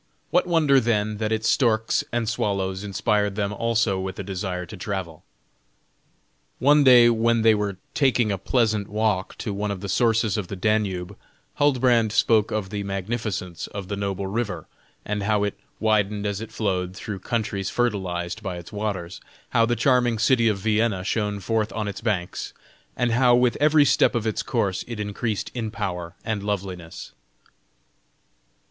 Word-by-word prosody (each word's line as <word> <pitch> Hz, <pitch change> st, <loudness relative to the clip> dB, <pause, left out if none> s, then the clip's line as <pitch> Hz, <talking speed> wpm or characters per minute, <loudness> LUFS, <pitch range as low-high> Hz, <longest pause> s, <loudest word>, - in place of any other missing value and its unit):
What -, -, +3 dB
wonder 155 Hz, -6 st, +4 dB
then, 110 Hz, -3 st, 0 dB
that 110 Hz, 0 st, -2 dB
its 110 Hz, 0 st, 0 dB
storks 110 Hz, -4 st, +2 dB
and 120 Hz, -1 st, -1 dB
swallows 100 Hz, -3 st, -1 dB
inspired 105 Hz, +1 st, 0 dB
them 100 Hz, -1 st, -1 dB
also 115 Hz, -2 st, +1 dB
with 95 Hz, 0 st, -5 dB
a -, -, -4 dB
desire 95 Hz, -1 st, -4 dB
to 90 Hz, -, -10 dB
travel? 90 Hz, -5 st, -5 dB, 1.3 s
One 145 Hz, +2 st, +5 dB
day 125 Hz, -3 st, +8 dB
when 115 Hz, 0 st, +2 dB
they 110 Hz, -1 st, +6 dB
were 105 Hz, -3 st, -2 dB, 0.2 s
taking 125 Hz, -6 st, +2 dB
a 100 Hz, -, -2 dB
pleasant 110 Hz, -1 st, +1 dB
walk 105 Hz, -3 st, -1 dB
to 105 Hz, -, -4 dB
one 105 Hz, +1 st, -2 dB
of 100 Hz, -2 st, -3 dB
the 100 Hz, -, -5 dB
sources 115 Hz, +2 st, +2 dB
of 100 Hz, -4 st, -3 dB
the 100 Hz, -, -5 dB
Danube, 95 Hz, -3 st, -1 dB, 0.4 s
Huldbrand 125 Hz, -6 st, +3 dB
spoke 110 Hz, -1 st, +3 dB
of 100 Hz, -3 st, -3 dB
the 105 Hz, -1 st, -3 dB
magnificence 100 Hz, -2 st, -4 dB
of 100 Hz, -2 st, -7 dB
the 100 Hz, -, -2 dB
noble 100 Hz, -1 st, -3 dB
river, 100 Hz, -5 st, -3 dB, 0.4 s
and 105 Hz, 0 st, -2 dB
how 105 Hz, 0 st, +1 dB
it 105 Hz, -, -3 dB, 0.2 s
widened 105 Hz, -1 st, +1 dB
as 100 Hz, 0 st, -2 dB
it 115 Hz, -, -7 dB
flowed 95 Hz, -3 st, -2 dB
through 105 Hz, -1 st, -6 dB
countries 100 Hz, -2 st, -2 dB
fertilized 95 Hz, -5 st, -2 dB
by 95 Hz, -4 st, -4 dB
its 85 Hz, +2 st, -10 dB
waters, 100 Hz, -4 st, -4 dB, 0.3 s
how 115 Hz, 0 st, +3 dB
the 120 Hz, -, +1 dB
charming 125 Hz, -3 st, +2 dB
city 120 Hz, +1 st, +3 dB
of 105 Hz, -3 st, +2 dB
Vienna 105 Hz, -1 st, +1 dB
shone 105 Hz, 0 st, -1 dB
forth 110 Hz, +3 st, -1 dB
on 110 Hz, -2 st, -2 dB
its 100 Hz, -1 st, -5 dB
banks, 100 Hz, -6 st, -2 dB, 0.4 s
and 120 Hz, -1 st, +1 dB
how 120 Hz, +1 st, +5 dB
with 125 Hz, -1 st, +3 dB
every 150 Hz, 0 st, +5 dB
step -, -, +3 dB
of 115 Hz, -2 st, -1 dB
its 110 Hz, -, -1 dB
course 105 Hz, -7 st, -1 dB
it 115 Hz, -3 st, -6 dB
increased 105 Hz, +1 st, -3 dB
in 115 Hz, -3 st, -3 dB
power 90 Hz, -6 st, -4 dB
and 110 Hz, -2 st, -2 dB
loveliness. 95 Hz, -5 st, -5 dB
105 Hz, 165 wpm, -24 LUFS, 95-115 Hz, 1.3 s, day